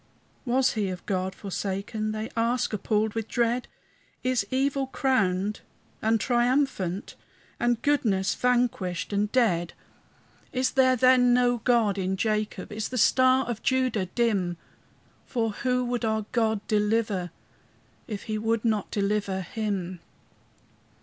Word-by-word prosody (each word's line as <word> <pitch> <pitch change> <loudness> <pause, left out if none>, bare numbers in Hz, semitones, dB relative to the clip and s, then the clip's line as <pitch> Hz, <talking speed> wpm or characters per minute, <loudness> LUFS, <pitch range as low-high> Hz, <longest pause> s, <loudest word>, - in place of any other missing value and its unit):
And 245 0 0
was 260 0 +4
he 210 -4 -1
of 180 -1 -7
God 185 -1 -2
forsaken? 200 +2 -3
They 215 +1 -4
ask, 230 +1 0
appalled 215 +1 0
with 225 -1 -3
dread; 240 +1 0 0.6
Is 255 -5 0
evil 270 +1 0
crowned 210 -7 0 0.4
and 220 +1 +2
triumphant, 240 -6 0 0.5
And 240 -1 +1
goodness 215 -10 +2
vanquished 235 -8 0
and 205 +1 0
dead? 180 -9 +1 0.8
Is 255 0 0
there, 260 -1 +4
then, 250 0 +5
no 245 -1 +3
God 225 -4 +2
in 190 0 -1
Jacob? 215 -2 -2
Is 215 +1 -3
the 255 - -4
star 255 +2 +4
of 230 -2 -4
Judah 255 -7 +1
dim? 190 -5 0 0.7
For 225 -3 -1
who 250 +3 0
would 245 -1 -2
our 220 -1 0
God 220 -3 0
deliver, 210 -3 +1 0.8
If 210 -3 -5
he 215 -1 -3
would 225 +1 0
not 215 -3 0
deliver 200 -1 -1
him? 190 -2 -3
220 Hz, 130 wpm, -26 LUFS, 200-245 Hz, 0.8 s, then